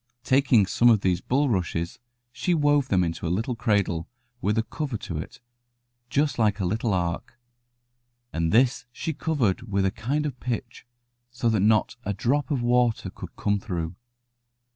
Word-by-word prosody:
Taking 130 -6 +4
some 120 +5 +4
of 110 -4 +4
these 90 -2 +1
bulrushes, 95 - 0 0.3
she 175 +8 0
wove 145 -3 +3
them 95 -5 +3
into 85 0 -3
a - - -1
little 110 +8 -1
cradle 100 -8 0 0.3
with 105 +3 +1
a 110 - +3
cover 135 +1 -4
to 85 -6 -5
it, - - -8 0.7
just 145 +1 +1
like 105 -2 +2
a 95 - 0
little 110 +5 0
ark, 85 -2 -2 1.0
and 80 0 0
this 125 +3 +3
she 160 +6 -3
covered 140 -11 0
with 100 0 +2
a 95 - +2
kind 140 +9 -2
of 130 -4 -4
pitch, 120 -1 -5 0.4
so 120 -1 -1
that 110 -2 +2
not 105 +4 +2
a 100 - -2
drop 130 +6 0
of 135 -5 0
water 120 -1 +2
could - - -10
come 100 0 0
through. 85 -3 -4
115 Hz, 165 wpm, -26 LUFS, 95-130 Hz, 1.0 s, Taking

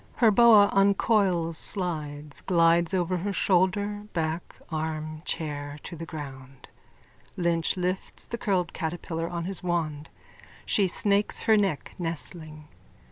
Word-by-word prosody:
Her 230 -3 +5
boa 215 -2 +7
uncoils, 195 -4 +2
slides, 150 -6 -2
glides 170 -1 +3
over 180 0 0
her 200 +4 -2
shoulder, 200 +3 +1
back, 165 0 -3 0.2
arm, 155 0 -3
chair 145 -3 -4
to - - -7
the 165 0 -7
ground. 135 -4 -9 0.7
Lynch 170 0 +1
lifts 185 +1 -3
the 235 - -6
curled 185 -6 0
catterpillar 165 0 -3
on 170 -1 -4
his 190 0 -3
wand. 160 -4 -2 0.6
She 200 -2 +3
snakes 200 +3 +1
her 220 -1 +4
neck, 195 -8 0
nestling. 155 -1 -6
170 Hz, 125 wpm, -27 LUFS, 155-195 Hz, 0.7 s, boa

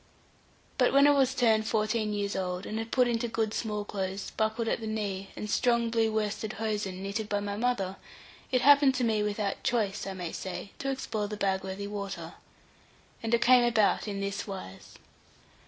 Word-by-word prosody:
But 250 - +4
when 280 +1 +7
I 290 - +7
was 270 -2 +3
turned 220 -4 +3
fourteen 215 -1 0
years 205 -1 -2
old, 180 0 -2
and 225 +1 -4
put 250 -2 +4
into 235 0 0
good 225 -1 -1
small 210 -2 -2
clothes, 195 -1 -4
buckled 220 +1 -1
at - - 0
the 220 - -5
knee, 200 -3 -3
and 210 - -5
strong 235 +1 +2
blue 225 -1 +2
worsted 215 0 -2
hosen, 205 -4 -3
knitted 205 +2 -3
by 205 - +1
my 200 0 -3
mother, 205 -5 -1 0.5
it 255 -1 +3
happened 280 0 +6
to 255 - 0
me 220 -2 +2
without 210 -1 -2
choice, 210 -5 0
I 195 - -3
may 175 -3 -5
say, 190 +1 -6
to 275 - -2
explore 220 -6 -2
the 210 0 -5
Bagworthy 190 0 -2
water. 200 -1 -5 0.9
And 225 - -3
it 235 - +3
came 250 0 +6
about 225 -3 +2
in 200 -1 -3
this 200 +2 -3
wise. 190 - -8
215 Hz, 185 wpm, -29 LUFS, 200-235 Hz, 0.9 s, when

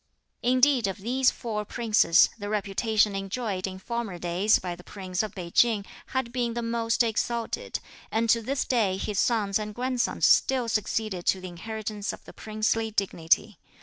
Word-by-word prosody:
Indeed 255 -1 +4
of 195 - -3
these 250 +6 +2
four 215 -3 -4
Princes, 215 -5 +4
the 205 0 -5
reputation 210 0 +1
enjoyed 195 -1 -3
in 185 0 -6
former 225 -1 -4
days 175 +5 +2
by 180 -1 -5
the 180 - -14
Prince 185 -2 -3
of 215 -2 -5
Pei 175 -3 -6
Ching 220 -2 +3 0.2
had 260 -3 -2
been 240 -2 -1
the 235 - -2
most 230 0 +1
exalted, 230 +1 -2 0.3
and 225 +1 0
to 230 - +3
this 265 +4 -1
day 210 -7 +1
his 200 0 -2
sons 210 -4 +2
and 210 -1 -5
grandsons 250 0 0
still 255 -3 +4
succeeded 215 -4 -1
to 190 - +3
the 185 - -6
inheritance 210 +3 -5
of - - -12
the - - -12
princely 220 +1 -1
dignity. 195 -1 0
215 Hz, 170 wpm, -27 LUFS, 195-235 Hz, 0.3 s, Indeed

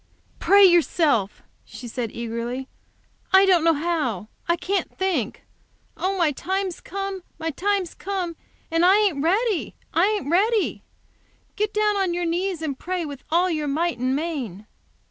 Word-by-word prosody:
"Pray 400 0 +6
yourself!" 315 - +2 0.2
she 245 - -10
said, 235 -1 -4
eagerly. 235 +3 -4 0.6
"I 385 +1 +7
don't 360 -4 +4
know 330 -1 +4
how. 290 - -2 0.2
I 340 - +3
can't 380 +3 -2
think. 370 - -1 0.5
Oh, 385 +1 -1
my 335 -4 +3
time's 375 +5 -3
come 390 0 -4 0.2
my 325 0 -2
time's 385 +3 -1
come! 370 -3 -4 0.4
And 330 +1 +2
I 370 +2 +7
ain't 390 -10 +2
ready! 400 +3 +1 0.2
I 340 +4 +4
ain't 420 -8 -1
ready! 420 +4 +2 0.7
Get 420 0 0
down 420 -1 +1
on 375 -3 0
your 350 0 -1
knees 345 0 -1
and 280 -4 -3
pray 360 -1 -3
with 285 -3 -8
all 345 +3 +3
your, 305 -2 -1
might 320 0 -1
and 255 +2 +1
main." 270 - -4
340 Hz, 155 wpm, -23 LUFS, 285-385 Hz, 0.7 s, I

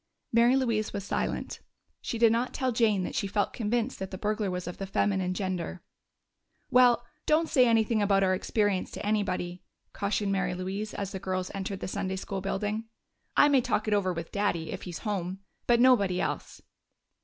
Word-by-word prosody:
Mary 235 +2 +5
Louise 230 -5 0
was 200 -1 -3
silent; - - -2 0.4
she 235 - -3
did 230 -1 +5
not 235 +2 0
tell 260 -1 0
Jane 220 -5 +2
that - - -4
she 200 - -1
felt 205 +1 0
convinced 235 +2 -1
that 190 - -4
the 185 - -6
burglar 210 0 -1
was 180 0 -3
of 175 - -7
the 195 - -4
feminine 190 -2 0
gender. 185 -2 -3 0.9
"Well, 245 -1 +5 0.2
don't 320 +2 +3
say 255 -5 +4
anything 225 -1 +3
about 195 -1 +3
our 185 -1 +3
experience 200 0 0
to - - -5
anybody," 185 -4 -1 0.3
cautioned 200 0 -1
Mary 185 -2 0
Louise 195 +4 -4
as 200 -1 -3
the 190 - -5
girls 185 0 -3
entered 195 0 -4
the - - -3
Sunday 190 0 -2
school 195 0 -4
building. 210 +3 -2 0.5
"I - - +7
may 280 -3 +4
talk 215 -2 -1
it 215 - +2
over 195 -3 +2
with 170 -1 -5
Daddy, 190 -6 -1
if - - -5
he's 180 +4 -7
home. 190 -2 -2 0.3
But 240 -1 +4
nobody 205 -8 +4
else." - - -3
200 Hz, 190 wpm, -28 LUFS, 185-225 Hz, 0.9 s, I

